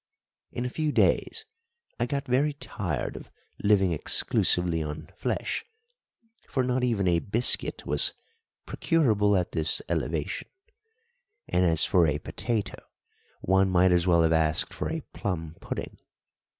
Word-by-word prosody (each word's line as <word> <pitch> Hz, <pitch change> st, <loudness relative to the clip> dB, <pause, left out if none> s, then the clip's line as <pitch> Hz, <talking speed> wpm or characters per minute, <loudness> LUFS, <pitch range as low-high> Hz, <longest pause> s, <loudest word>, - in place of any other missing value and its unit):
In 120 Hz, -, -4 dB
a -, -, -2 dB
few 155 Hz, +3 st, -2 dB
days 440 Hz, -, +1 dB, 0.5 s
I 120 Hz, -, 0 dB
got 140 Hz, +2 st, -3 dB
very 140 Hz, +4 st, +1 dB
tired 90 Hz, -, -4 dB
of -, -, -10 dB, 0.3 s
living 100 Hz, -3 st, +3 dB
exclusively 85 Hz, +1 st, +2 dB
on 75 Hz, 0 st, -7 dB
flesh, -, -, -3 dB, 0.9 s
for 130 Hz, -, 0 dB
not 125 Hz, 0 st, -1 dB
even 110 Hz, -6 st, 0 dB
a 85 Hz, -1 st, +3 dB
biscuit 115 Hz, +7 st, +2 dB
was -, -, +4 dB, 0.5 s
"procurable 110 Hz, -, +1 dB
at 90 Hz, -, -4 dB
this 80 Hz, -1 st, +2 dB
elevation"; 80 Hz, -2 st, -3 dB, 1.0 s
and 90 Hz, +1 st, +1 dB
as 80 Hz, -2 st, +3 dB
for 85 Hz, -3 st, +3 dB
a 75 Hz, -1 st, 0 dB
potato, 110 Hz, +7 st, -4 dB, 0.6 s
one 95 Hz, +1 st, +2 dB
might 90 Hz, 0 st, +3 dB
as 90 Hz, 0 st, +2 dB
well 85 Hz, -2 st, +4 dB
have 80 Hz, 0 st, +2 dB
asked 80 Hz, -1 st, +2 dB
for -, -, -4 dB
a -, -, -3 dB
plum 80 Hz, -5 st, -4 dB
pudding. -, -, -6 dB
95 Hz, 135 wpm, -27 LUFS, 80-120 Hz, 1.0 s, was